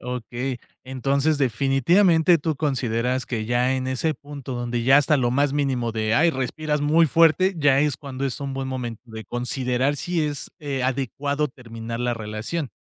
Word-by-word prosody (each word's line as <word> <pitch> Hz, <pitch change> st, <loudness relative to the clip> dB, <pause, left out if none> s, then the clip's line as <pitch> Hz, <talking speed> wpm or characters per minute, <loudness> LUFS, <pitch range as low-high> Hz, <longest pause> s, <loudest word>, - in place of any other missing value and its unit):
Okey, 125 Hz, +1 st, -4 dB, 0.3 s
entonces 140 Hz, +3 st, 0 dB
definitivamente 160 Hz, -, +3 dB
tú 155 Hz, +1 st, -1 dB
consideras 130 Hz, -3 st, -1 dB
que 110 Hz, -3 st, -3 dB
ya 125 Hz, +2 st, +1 dB
en 130 Hz, 0 st, -2 dB
ese 150 Hz, +4 st, 0 dB
punto 140 Hz, -3 st, -8 dB
donde 120 Hz, -1 st, -2 dB
ya 135 Hz, +3 st, +6 dB
hasta 145 Hz, +1 st, +4 dB
lo 120 Hz, -3 st, +1 dB
más 140 Hz, +1 st, +2 dB
mínimo 135 Hz, -5 st, 0 dB
de 110 Hz, 0 st, 0 dB
ay, 165 Hz, +6 st, +4 dB
respiras 150 Hz, +2 st, -2 dB
muy 155 Hz, +3 st, +4 dB
fuerte, 165 Hz, +5 st, +4 dB
ya 140 Hz, -3 st, +4 dB
es 150 Hz, -2 st, +1 dB
cuando 140 Hz, -2 st, -6 dB
es 135 Hz, -3 st, -2 dB
un 140 Hz, -2 st, -4 dB
buen 135 Hz, 0 st, -3 dB
momento 120 Hz, -4 st, -5 dB
de 110 Hz, -1 st, -9 dB
considerar 125 Hz, +2 st, -1 dB
si 170 Hz, +2 st, -1 dB
es, 145 Hz, -2 st, -5 dB
eh, 140 Hz, -4 st, -2 dB
adecuado 140 Hz, +3 st, -1 dB
terminar 115 Hz, -3 st, -8 dB
la 120 Hz, 0 st, 0 dB
relación. 110 Hz, +8 st, -4 dB
135 Hz, 175 wpm, -23 LUFS, 120-145 Hz, 0.3 s, ya